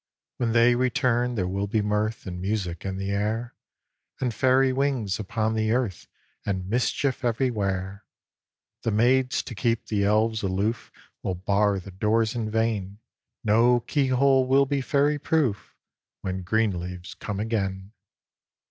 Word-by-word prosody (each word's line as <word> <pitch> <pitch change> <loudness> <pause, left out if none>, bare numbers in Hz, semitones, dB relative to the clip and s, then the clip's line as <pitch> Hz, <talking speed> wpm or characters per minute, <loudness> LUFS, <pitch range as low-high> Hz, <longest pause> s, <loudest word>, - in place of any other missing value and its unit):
_ - - +2
_When 115 -1 +1
they 120 +1 +5
return 125 0 +1
there 95 -4 -1
will 100 +2 -2
be 110 +2 0
mirth, 105 +2 -1
And 90 -2 -6
music 95 -4 -2
in 95 -1 -3
the 95 0 -3
air, 110 +4 -1 0.7
And 125 -3 -1
Fairy 130 +2 +3
wings 130 -8 0
upon 110 +2 -1
the 110 -1 0
earth, 120 -9 -2 0.4
And 95 -2 -2
mischief 125 +4 0
everywhere. 100 -5 -1 0.8
The - - -1
maids, 125 +4 +2
to 125 - -7
keep 115 +1 0
the 105 -2 0
Elves 110 +2 +2
aloof, 100 +4 -1 0.3
Will 95 - -2
bar 100 +2 +1
the 95 +2 -10
doors 110 +4 +1
in 115 -3 -2
vain; 105 -3 -1 0.5
No 120 +3 +4
keyhole 135 0 +2
will 135 +1 +4
be 140 0 -1
Fairy 145 +2 +1
proof, 135 -11 0 0.5
When 95 0 -3
green 105 0 +1
leaves 90 +2 -7
come 100 -2 -5
again. 100 -3 -2
110 Hz, 150 wpm, -25 LUFS, 100-125 Hz, 0.8 s, they